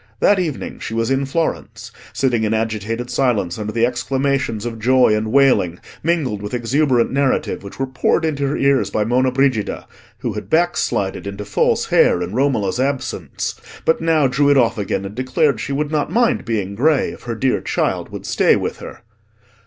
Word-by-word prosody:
That 200 -1 +4
evening 160 -6 -4
she 115 - -5
was 115 +2 0
in 135 0 0
Florence, 165 +4 -3 0.2
sitting 120 -4 0
in 110 0 +1
agitated 115 +2 -3
silence 110 -9 0
under 105 0 -3
the 115 +1 +2
exclamations 130 -2 -1
of 115 -1 -5
joy 125 -1 +4
and 110 0 -2
wailing, 130 -11 +3 0.2
mingled 150 -11 0
with 105 +4 -4
exuberant 125 0 +1
narrative, 140 -1 0
which 100 - -10
were 135 - +1
poured 130 +5 0
into 145 -3 -1
her 140 - -1
ears 140 -1 +2
by 105 - 0
Monna 130 +3 +2
Brigida, 130 -5 0 0.3
who - - -3
had 105 -2 -7
backslided 160 - 0
into 100 +1 -6
false 100 - +1
hair - - +3
in 90 +3 -6
Romola's 120 -5 0
absence, 135 0 -2 0.3
but 160 - +2
now 165 -3 +3
drew 135 +2 +2
it 145 - +5
off 115 -4 +2
again 100 -1 -2
and 100 - -7
declared 130 +2 +1
she 130 - -4
would 145 +2 -1
not 150 0 -1
mind 235 +1 +2
being 105 -4 -2
grey, 145 +7 +2
if - - -12
her 120 -1 -5
dear 130 +3 0
child - - -1
would - - -8
stay - - +3
with - - -3
her. - - -10
125 Hz, 185 wpm, -19 LUFS, 110-140 Hz, 0.3 s, it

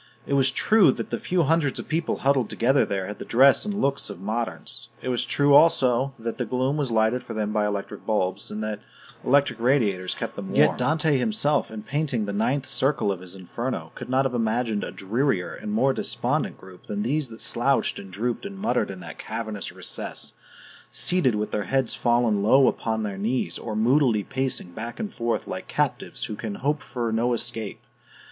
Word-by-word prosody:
It - - -3
was 135 -1 +4
true 210 +9 +5
that - - -6
the - - -1
few 180 -1 +1
hundreds 155 -2 +1
of - - -6
people 160 +2 0
huddled 135 -4 +3
together 135 +4 +3
there 95 -2 -2
had 105 +1 -7
the - - -5
dress 135 - +5
and 210 - -2
looks 140 -8 0
of - - -8
moderns; 110 +4 -3
it - - -4
was 125 -1 +1
true, 145 0 +3
also, 135 -3 +4
that 115 +1 -5
the - - +1
gloom 130 +4 0
was 145 -4 -1
lighted 110 +2 +2
for - - -8
them 105 -1 -1
by 105 -1 +2
electric 100 -1 -4
bulbs, 100 -3 0
and 105 +1 -4
that 110 -1 -3 0.4
electric 140 -1 +3
radiators 110 -8 +1
kept - - -5
them - - -6
warm; - - -5
yet - - +5
Dante 155 -2 +2
himself, 150 - +1
in 110 -1 -7
painting 135 -5 -1
the 100 - -4
ninth 130 +7 0
circle 135 -7 +2
of 95 - -3
his 90 0 -11
Inferno, 120 +7 -4
could - - -8
not 130 +1 +2
have 130 - -1
imagined 115 -2 0
a - - -4
drearier 105 -1 -1
and 215 - -6
more 135 -11 +3
despondent - - -1
group 95 -1 -15
than 105 0 -2
these 140 +3 0
that 115 - -11
slouched - - +1
and 95 - -10
drooped 115 +5 -2
and 200 -1 -7
muttered 215 +4 0
in 95 -1 -7
that 80 -3 -9
cavernous 110 -4 -5
recess, - - -4 0.6
seated 175 -11 +2
with 105 0 -2
their 105 - -1
heads 135 -3 0
fallen 120 -4 +2
low 130 +6 +5
upon 110 -1 -1
their 100 -2 -4
knees, 120 +5 -1
or 110 -2 -5
moodily 120 -1 +3
pacing 130 -8 -3
back 115 +6 -6
and 210 -2 -4
forth 115 0 -1
like - - -6
captives - - -2
who 105 - -5
can 105 -1 -5
hope 145 +6 -1
for 120 -3 -3
no 120 +2 +1
escape. 115 -3 -3
120 Hz, 205 wpm, -25 LUFS, 105-140 Hz, 0.6 s, true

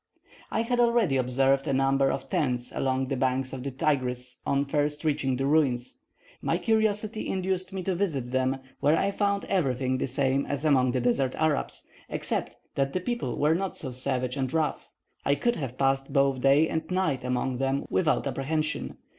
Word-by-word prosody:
I 225 - 0
had 245 +1 0
already 235 - +3
observed 135 +2 +2
a - - +1
number 135 0 +3
of 135 0 -4
tents 125 -3 -1
along 130 0 0
the 135 - -2
banks 130 0 0
of 130 - -5
the 140 - -2
Tigris 125 -2 -1
on 140 0 +2
first 145 +1 -1
reaching 145 -4 +1
the 135 +2 -1
ruins; 140 - +1 0.4
my - - +1
curiosity 220 -1 0
induced 185 0 -1
me 190 -1 -4
to 190 - 0
visit 155 -10 -2
them, 130 +1 +1 0.2
where 150 +3 +3
I 200 - +1
found 200 0 0
everything 130 -7 0
the - - 0
same 135 +1 +1
as 145 +2 -2
among 130 -4 +3
the 130 - 0
desert 125 +2 +1
Arabs, 155 -2 -1 0.2
except - - -2 0.2
that 135 0 0
the 185 - 0
people 240 +6 -3
were 150 +2 +3
not 190 +3 -2
so 130 - -5
savage 125 0 -2
and 130 -2 -1
rough; 160 -2 -1 0.3
I 140 - +3
could 240 +11 0
have 130 -4 -5
passed 135 0 +1
both 135 -2 +2
day 140 +4 +5
and 160 0 -3
night 170 -9 0
among 125 0 -1
them 135 +1 0
without 165 -5 +2
apprehension. 155 +3 -2
140 Hz, 185 wpm, -27 LUFS, 130-160 Hz, 0.4 s, day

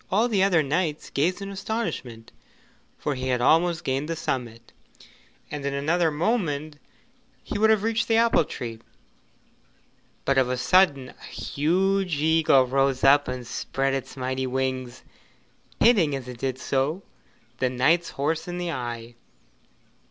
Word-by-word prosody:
All 215 +5 +2
the 210 -5 +1
other 180 -5 +4
knights 155 +1 -2
gazed 180 +7 0
in 195 - -6
astonishment, 190 - -4 0.7
for 150 - -2
he 130 -1 -4
had 125 -1 +1
almost 165 +6 +3
gained 135 +4 -2
the 165 - -1
summit, 120 -6 -4 0.8
and 145 -1 -5
in 140 0 -2
another 160 +4 +1
moment 155 -3 -1 0.7
he 205 - -4
would 220 +1 +4
have 215 -2 +3
reached 225 +1 0
the 225 - +2
apple 230 -6 +4
tree; 115 -6 -7 1.5
but 135 -1 +3
of 130 -1 +1
a 125 - -1
sudden 140 -1 +3
a - - -17
huge 180 +2 0
eagle 155 -4 +4
rose 135 0 +1
up 145 +1 +5
and 125 -1 -5
spread 135 +3 -2
its 135 0 -5
mighty 130 0 -2
wings, 130 -1 -3 0.8
hitting 185 - +4
as 130 -2 -6
it 125 -2 -9
did 130 0 -2
so 140 +8 -1 0.6
the 130 - +1
knight's 155 +8 +2
horse 155 +4 -2
in 175 0 -4
the 175 -1 -3
eye. 120 -4 -5
145 Hz, 150 wpm, -25 LUFS, 130-175 Hz, 1.5 s, up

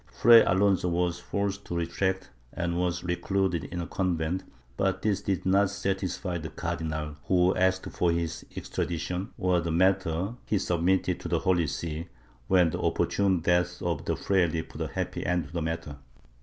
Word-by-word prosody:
Fray 115 -1 +7
Alonso 95 -1 +2
was 85 0 0
forced 100 +2 -2
to 85 - -4
retract, 85 0 -1 0.2
and 85 -1 -2
was 90 -1 -1
recluded 90 0 0
in 90 - -5
a 85 - -2
convent, 90 0 -1 0.3
but 95 +3 0
this 105 -3 +1
did 95 -2 -2
not 95 +1 +4
satisfy 95 -2 -2
the 80 0 -6
Cardinal, 75 -2 -4
who 90 0 +3
asked 95 0 +2
for 85 - +1
his 85 -1 -2
extradition, 90 +3 -3
or 90 -2 +2
that 85 - -4
the 85 - -1
matter 95 +2 +2
he 105 - +2
submitted 90 0 +1
to - - -6
the - - +1
Holy 85 -4 +2
See, 80 +4 -4 0.4
when 90 -1 +4
the - - -3
opportune 95 -3 +1
death 90 +1 +1
of 85 -4 -2
the - - 0
fraile 85 -4 +1
put - - -9
a - - -1
happy - - -3
end 90 0 0
to 70 - -14
the 85 - -1
matter. 80 -2 -4
90 Hz, 175 wpm, -28 LUFS, 85-95 Hz, 0.4 s, Fray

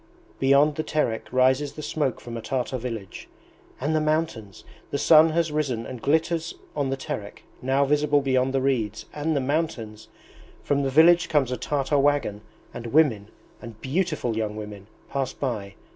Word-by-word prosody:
Beyond 140 +2 +4
the 155 - -1
Terek 150 -8 -1
rises 130 +3 +2
the 155 - -8
smoke 145 -5 -1
from 120 -1 -8
a 115 - -4
Tartar 130 +1 -2
village... 115 -6 -7 0.5
and 150 +4 0
the 155 - +2
mountains! 155 -10 -2 0.3
The - - -1
sun 160 +2 +6
has 165 0 0
risen 135 -7 -1
and 125 -1 -8
glitters 160 +2 0 0.2
on 140 -2 0
the 135 - -1
Terek, 100 -5 -6 0.2
now 135 +2 +2
visible 145 +1 +2
beyond 130 -1 +1
the 135 0 0
reeds... 115 -6 -1
and 150 +1 -1
the - - +2
mountains! 130 -7 -2 0.6
From 140 0 +1
the 135 - 0
village 165 +5 +5
comes 140 -5 +2
a - - 0
Tartar 140 +2 0
wagon, 140 -8 +1 0.3
and 120 0 -6
women, 115 -7 +3 0.5
beautiful 150 -5 -1
young 110 -1 -2
women, 105 -2 -8 0.2
pass 135 -2 -2
by... 105 -8 -4
135 Hz, 165 wpm, -25 LUFS, 115-150 Hz, 0.6 s, sun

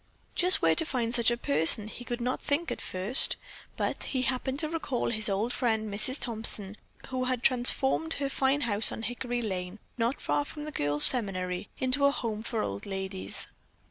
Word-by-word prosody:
Just 365 +1 +3
where - - +4
to 330 - +3
find 245 -6 -3
such 235 -1 +3
a 240 - -1
person 160 +3 +4
he 245 - -9
could 245 0 -5
not 250 +2 -2
think 305 +4 -2
at - - -5
first, 190 +7 +4 0.4
but - - -2
he 260 -2 -2
happened 260 +1 -2
to 310 - -2
recall 305 -8 -3
his 220 -2 +3
old 210 +5 -1
friend 220 -4 -1
Mrs. 255 +6 +2
Thompson, 215 -3 +1 0.3
who 255 -1 -2
had 255 -1 -2
transformed 265 +5 +2
her 280 -1 -2
fine 275 +1 0
house 220 -3 +1
on 225 - -6
Hickory 245 +1 -3
lane, 185 -2 -5 0.2
not 235 +4 -1
far 290 - -1
from 295 +1 -9
the 305 - -7
girls' 145 - +5
seminary, 185 -6 0
into 260 +2 0
a 280 - +4
home 225 -6 -4
for 225 -1 -3
old 100 - -5
ladies. 190 -1 -6
240 Hz, 190 wpm, -28 LUFS, 205-265 Hz, 0.4 s, girls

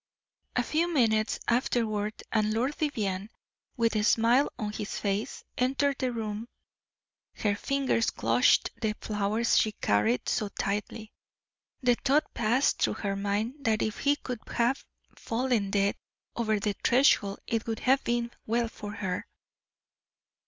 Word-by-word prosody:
A 245 - +2
few 330 +7 0
minutes 220 -7 +2
afterward 220 -3 0
and 215 -1 +1
Lord 255 +6 +1
Vivianne, 210 -9 -2 0.5
with 230 -1 +2
a 210 - +2
smile 235 +5 +4
on 210 -4 -3
his 210 0 -4
face, 200 +1 -2 0.2
entered 270 +2 +1
the 255 -2 0
room. 220 -1 -4 0.9
Her 205 -2 0
fingers 265 0 +1
clutched - - +3
the 215 -2 0
flowers 215 +2 +1
she 215 - +1
carried 110 - +1
so 210 - 0
tightly; 210 +2 -3 0.7
the 245 -1 +5
thought 290 +3 +2
passed 240 +4 +1
through - - +2
her 200 -2 -2
mind 210 +8 -2
that 220 -2 +2
if 215 +1 -3
he 285 +1 +3
could 250 -5 -6
but - - -10
have 240 +3 +1 0.3
fallen 230 -4 -1
dead 200 0 +1 0.4
over 220 -3 +1
the 205 0 0
threshold 235 -6 +4
it 230 0 -2
would 225 -1 -3
have 265 +2 +3
been 235 0 -1 0.2
well 230 +1 +1
for 205 -1 -8
her. 190 -4 -3
225 Hz, 145 wpm, -28 LUFS, 210-250 Hz, 0.9 s, the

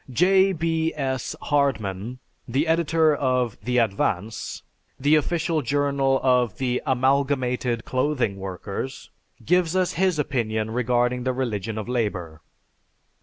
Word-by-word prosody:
J. 190 +8 +4
B. 165 -1 0
S. 130 -3 -2
Hardman, 125 -6 0 0.3
the 135 +6 +1
editor 160 -1 +3
of 125 -4 0
The 125 0 -1
Advance, 105 -2 -1 0.4
the 145 +3 +3
official 160 +1 0
journal 140 -2 +1
of 125 -5 +2
the 125 -1 -1
Amalgamated 130 -2 +1
Clothing 130 -6 0
Workers, 95 +6 -6 0.3
gives 180 +2 +2
us 185 -1 +2
his 185 -2 +1
opinion 110 -6 -1
regarding 125 +1 +1
the 130 0 0
religion 110 -4 -3
of 110 - -4
labor. 95 -10 -2
130 Hz, 120 wpm, -24 LUFS, 115-150 Hz, 0.4 s, J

